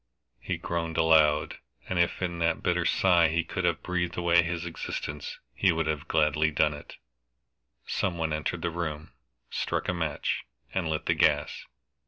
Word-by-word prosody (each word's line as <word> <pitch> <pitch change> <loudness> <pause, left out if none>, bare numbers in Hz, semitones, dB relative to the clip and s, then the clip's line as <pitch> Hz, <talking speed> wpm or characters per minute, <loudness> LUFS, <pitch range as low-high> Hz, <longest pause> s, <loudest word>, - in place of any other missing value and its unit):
He - - -3
groaned 85 -1 -3
aloud, 80 -2 +4 0.3
and 95 - -1
if 85 +2 +1
in 85 -1 -2
that 85 0 0
bitter - - +1
sigh 90 -3 +4
he 80 +1 0
could 95 +2 -3
have 85 -3 0
breathed 90 -1 -2
away 85 0 +4
his 85 0 -3
existence 75 -3 -5 0.2
he 95 +6 +3
would 80 -1 0
have 80 0 -2
gladly 75 0 +2
done 75 0 +2
it. 75 - -10 0.9
Some 90 -3 -1
one 80 -2 -1
entered 80 +2 -2
the 85 - 0
room, 80 -3 -4 0.4
struck - - -2
a - - +1
match, 80 -4 -2 0.3
and 90 -4 -1
lit 80 -1 -2
the - - +3
gas. - - +1
80 Hz, 170 wpm, -28 LUFS, 80-85 Hz, 0.9 s, aloud